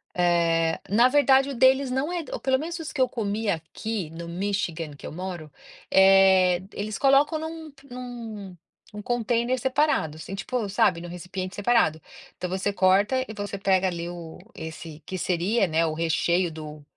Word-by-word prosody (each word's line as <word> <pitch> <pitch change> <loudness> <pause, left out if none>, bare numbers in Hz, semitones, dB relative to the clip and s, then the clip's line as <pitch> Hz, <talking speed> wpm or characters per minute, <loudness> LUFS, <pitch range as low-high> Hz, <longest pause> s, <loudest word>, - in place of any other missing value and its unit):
eh, 170 -2 +2
na 235 +5 +5
verdade 270 0 +4
o 275 - -4
deles 260 +2 +4
não 265 +6 -1
é 350 -2 -2
ou - - -3
pelo 260 0 +1
menos 340 +3 -4
os 325 -1 -6
que 300 - -7
eu 255 - +4
comi 215 -2 -2
aqui, 175 +2 -3
no 170 +1 -8
Michigan, 170 -4 -3
que - - -10
eu - - -7
moro, 175 -4 -6 0.4
eh, 190 -2 +5
eles 210 0 -4
colocam 280 +3 +3
num 320 -1 -7
p 275 0 -21
num 230 -6 -8 0.4
um 210 - -6
container 240 +2 0
separado, 265 - +1
assim, 195 +4 -7
tipo, 215 +2 -3
sabe, 195 -4 +2
num 175 - -7
recipiente 185 +2 -6
separado. 205 -7 +2 0.4
Então, 180 - -3
você 190 +2 -1
corta 200 +7 +2
e 215 - -7
você 205 -1 -5
pega 190 -1 +2
ali 170 -2 -3
o 170 -2 -9 0.2
esse, 160 -1 -8
que 185 - -5
seria, 185 +5 +1
né, 165 0 +1
o 155 - -1
recheio 170 +2 +1
do 155 -1 -9
195 Hz, 175 wpm, -25 LUFS, 175-250 Hz, 0.4 s, na